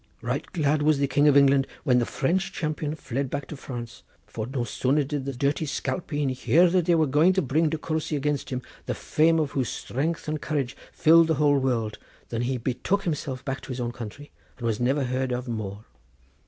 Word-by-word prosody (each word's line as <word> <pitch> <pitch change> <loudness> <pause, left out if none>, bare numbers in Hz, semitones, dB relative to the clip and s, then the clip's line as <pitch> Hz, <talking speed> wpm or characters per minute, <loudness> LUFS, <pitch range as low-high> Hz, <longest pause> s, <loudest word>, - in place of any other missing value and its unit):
Right - - -3
glad 150 -3 +1
was 150 0 +3
the 140 - +2
King 145 +2 +3
of 145 -1 +6
England 140 -1 +5 0.2
when 125 -4 +4
the 120 - 0
French 180 +7 0
champion 155 -1 -3
fled 135 -2 -3
back 145 0 -4
to - - -6
France, 120 -4 -7 0.2
for 110 +1 -5
no 130 -1 -2
sooner 130 +5 +1
did 140 -1 -3
the 140 - -3
dirty 140 +4 0
spalpeen 145 -1 -2
hear 150 +7 +4
that 180 -2 +2
they 175 -1 +4
were 160 -1 +4
going 150 +6 +4
to 190 - +2
bring 155 +4 +2
De 160 - -2
Courcy 155 0 -2
against 145 0 -1
him, 125 -1 -3 0.2
the - - -1
fame 165 +2 +2
of 150 -3 0
whose 130 -4 -1
strength 155 +6 -3
and 155 -1 -2
courage 140 -4 -2 0.2
filled 165 +1 +6
the 160 - +2
whole 145 -1 +3
world, 115 -5 -1 0.3
than 115 -1 -2
he 125 +1 -1
betook 130 - -1
himself 145 -6 -3
back 135 -1 -3
to - - -12
his 130 -1 -4
own 120 -1 -2
country 120 +5 -9 0.3
and 120 - -6
was 110 -2 0
never 135 +4 +1
heard 130 0 -1
of 125 +1 -3
more. 110 -3 -5
140 Hz, 215 wpm, -26 LUFS, 125-155 Hz, 0.3 s, of